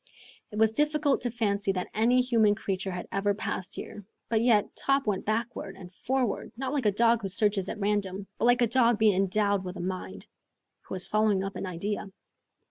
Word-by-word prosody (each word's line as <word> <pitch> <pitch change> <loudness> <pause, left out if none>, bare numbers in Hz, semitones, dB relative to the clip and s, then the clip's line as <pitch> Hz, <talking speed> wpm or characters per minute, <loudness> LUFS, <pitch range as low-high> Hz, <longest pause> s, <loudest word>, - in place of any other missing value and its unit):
It 210 - -8
was 220 0 +4
difficult 295 +1 +1
to 245 - -1
fancy 200 -4 0
that 180 -1 -4
any 240 +4 +3
human 225 -4 +3
creature 195 -2 -3
had 180 -1 -5
ever 200 +1 0
passed 190 -3 -4
there, 210 - -8 0.3
but 220 -1 +2
yet 225 -4 +2
Top 275 0 +1
went 205 -3 -2
backward 220 -3 -2
and 185 -1 -12
forward, 255 +2 -2
not 265 +1 -3
like 270 -7 +1
a - - +4
dog 230 +2 +3
who 195 - -3
searches 200 0 0
at - - -4
random, 200 -1 -1
but - - +1
like 245 0 +4
a - - +6
dog 235 -1 +3
being 215 -1 +4
endowed 200 +1 +1
with 180 0 -6
a - - -7
mind, 175 - -5 0.6
who - - -5
is 185 - +1
following 215 -2 +2
up 195 0 -5
an 195 - -4
idea. 200 +4 -3
210 Hz, 205 wpm, -28 LUFS, 195-235 Hz, 0.6 s, a